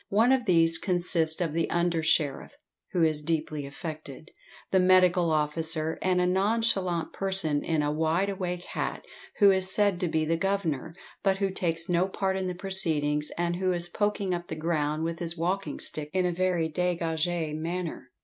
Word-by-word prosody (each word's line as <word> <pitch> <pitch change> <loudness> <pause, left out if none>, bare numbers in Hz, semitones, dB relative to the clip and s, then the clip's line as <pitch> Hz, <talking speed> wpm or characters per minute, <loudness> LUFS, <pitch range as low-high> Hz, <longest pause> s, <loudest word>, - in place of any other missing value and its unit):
One 225 +5 +4
of 260 -2 +2
these 165 -3 +3
consists 175 -3 +2
of 165 -4 -1
the 165 0 0
under 170 -1 +1
sheriff 155 - 0 0.3
(who 175 -3 +1
is 155 -2 +2
deeply 155 -2 -2
affected), 155 0 -8 0.4
the 190 - +4
medical 185 -2 +4
officer, 155 +1 -1
and 185 -1 +1
a 180 - +2
nonchalant 190 -2 +1
person 190 -7 -1
in 160 -2 0
a 145 0 0
wideawake 180 +3 -1
hat, - - -4 0.3
who 200 -2 +6
is 190 0 +3
said 200 -3 +3
to 180 - 0
be 160 -1 0
the 165 +1 0
governor, 165 -5 -2 0.3
but 195 -1 +2
who 195 -1 0
takes 165 -2 -2
no 175 +1 +2
part 190 0 -1
in 190 -1 -2
the 180 - -3
proceedings, 160 -6 0
and 175 0 -1
who 185 0 0
is 175 0 -1
poking 205 -1 -1
up 175 0 -4
the - - -5
ground 155 -1 -1
with 165 0 -3
his 170 0 -3
walking 185 +4 -2
stick 150 -1 -1
in 185 -1 +1
a 180 - +1
very 180 -2 0
degagé 165 -1 -1
manner. 165 -3 -4
175 Hz, 180 wpm, -27 LUFS, 160-185 Hz, 0.4 s, who